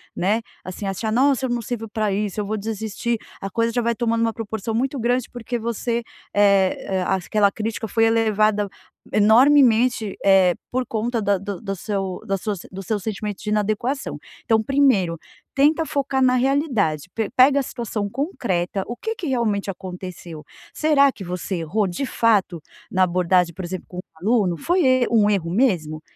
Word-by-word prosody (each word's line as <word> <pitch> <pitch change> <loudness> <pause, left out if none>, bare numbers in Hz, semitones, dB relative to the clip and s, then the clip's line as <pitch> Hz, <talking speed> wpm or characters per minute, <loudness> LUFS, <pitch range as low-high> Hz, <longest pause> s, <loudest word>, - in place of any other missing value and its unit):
né, 210 +5 +1 0.2
assim, 185 +2 -6
achar: 195 +3 -2
"Nossa 265 +2 +3
eu - - -2
não 240 -1 -1
sirvo 225 -1 -5
pra 215 -1 -1
isso, 205 +1 -2
eu 210 - -1
vou 215 +2 -2
desistir". 220 +2 -3 0.2
A 195 - -4
coisa 230 +4 0
já 245 - +1
vai 235 0 0
tomando 230 -1 0
uma 230 0 +1
proporção 220 0 -4
muito 265 +3 -1
grande, 245 +1 0
porque 245 0 -4
você, 235 +1 -2 0.3
é 195 -1 +2
é, - - 0
as 190 -1 -1
aquela 210 -2 +3
crítica 220 +1 -4
foi 225 +2 +1
elevada 215 -2 +2 0.4
enormemente, 230 -1 +4
eh, 190 -2 +5 0.2
por 255 0 -1
conta 230 +1 -2
da 200 -1 +2
do 200 0 -6
do 195 -3 -4
seu 195 -1 -3
da 195 -2 -1
sua 210 +2 -3 0.2
do 195 +1 -7
seu 215 +4 -1
sentimentos 210 0 -5
de 210 - -3
inadequação. 215 +6 -1 0.3
Então, 220 -1 +3
primeiro 215 -11 +2 0.4
tenta 305 +4 +3
focar 280 -3 -1
na 255 -1 +4
realidade, 245 - 0
pe 225 -2 -2
pega 270 +2 +5
a - - 0
situação 220 -5 -4
concreta, 200 - -2
o 240 - -4
que 445 - -3
que 360 - -5
realmente 220 -7 0
aconteceu. 180 -4 -8 0.3
Será 285 -3 +4
que 205 - -10
você 180 +1 -4
errou, 175 +6 0
de 180 +10 -3
fato, 205 -8 +1 0.3
na 185 0 +3
abordagem, 180 -1 +2
por 185 - -7
exemplo, 185 +1 -6
com 180 - -11
um - - -3 0.2
aluno? 200 -4 +2
Foi 350 - +1
e 255 -1 +4
um 215 -3 +4
erro 185 -5 0
mesmo? 175 -9 +1
215 Hz, 180 wpm, -22 LUFS, 195-240 Hz, 0.4 s, eh